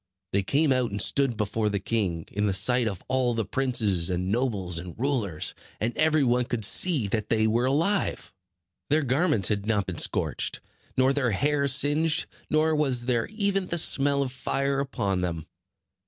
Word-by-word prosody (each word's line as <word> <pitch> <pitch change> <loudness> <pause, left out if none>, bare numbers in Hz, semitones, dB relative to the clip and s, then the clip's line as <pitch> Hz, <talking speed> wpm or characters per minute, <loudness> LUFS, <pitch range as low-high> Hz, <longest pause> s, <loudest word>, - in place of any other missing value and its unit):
They 100 - +2
came 140 +8 +2
out 125 -2 0
and 100 - -5
stood 135 -2 0
before 105 0 -1
the 100 -1 -2
king, 95 -6 -2
in 105 +1 -1
the 95 - 0
sight 120 +4 +3
of 100 -5 -5
all 130 -2 +1
the 115 -2 -1
princes, 105 -8 0
and 90 +1 -2
nobles, 100 -8 -1
and 90 0 -9
rulers; 115 - -1 0.3
and 115 +3 -2
every 155 -1 +2
one 125 -1 +2
could 115 -3 -2
see 155 - +3
that 110 0 -2
they 110 -1 +2
were 115 +3 +1
alive. 165 +10 0 0.6
Their 150 +1 +2
garments 135 - +1
had 105 -1 -2
not 105 -3 +1
been 90 -3 -3
scorched, - - -1 0.4
nor 130 +1 +3
their 135 -3 +1
hair 140 +5 +1
singed, 150 +4 +2 0.2
nor 155 +1 +2
was 130 -5 +1
there 120 -2 0
even 200 -3 -1
the 170 - -2
smell 140 -3 +3
of 130 - -5
fire 135 +1 -1
upon 100 -9 -2
them. 85 -3 -3
125 Hz, 180 wpm, -26 LUFS, 100-140 Hz, 0.6 s, sight